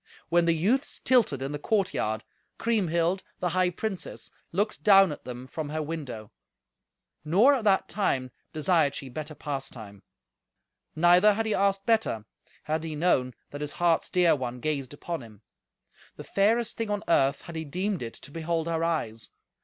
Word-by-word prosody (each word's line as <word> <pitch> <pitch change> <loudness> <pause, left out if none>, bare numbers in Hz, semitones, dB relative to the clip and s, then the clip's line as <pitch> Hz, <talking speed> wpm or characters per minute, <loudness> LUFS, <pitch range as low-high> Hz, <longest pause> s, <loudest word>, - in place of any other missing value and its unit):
When 170 0 +4
the 165 -1 +3
youths 230 - +1
tilted 225 - +2
in 135 - -3
the 145 - -4
courtyard, 145 - 0 0.3
Kriemhild, 185 -5 +1 0.2
the 180 - 0
high 180 +1 +2
princess, 190 +2 -5 0.2
looked 205 +5 -1
down 195 -4 +7
at 150 - -8
them 125 0 -7
from 150 +3 -5
her 155 +1 -2
window; 135 -9 -6 0.9
nor, 200 - +5
at 250 -6 -1
that 195 -2 +3
time, 130 -11 -1 0.2
desired 155 -3 +2
she 135 - -6
better 155 +4 -6
pastime. 120 -9 -6 0.9
Neither 175 +5 +6
had 225 +1 -1
he 220 - 0
asked 195 0 +1
better, 220 - +1 0.4
had 155 +1 -2
he 160 -2 -4
known 135 -7 +1 0.2
that 145 - -7
his 150 -1 -3
heart's 170 -2 +2
dear 175 -3 +4
one 125 -2 -4
gazed 140 -3 -2
upon 170 +1 -5
him: 110 -3 -14 0.7
the - - -9
fairest 225 +4 +1
thing 225 -2 -2
on 205 0 -1
earth 140 -4 +2
had 170 - -9
he 160 - -3
deemed 185 +5 -2
it 115 -1 -6
to 140 - -12
behold 165 +1 -2
her 165 -1 -1
eyes. 115 -10 -2
165 Hz, 170 wpm, -27 LUFS, 140-195 Hz, 0.9 s, down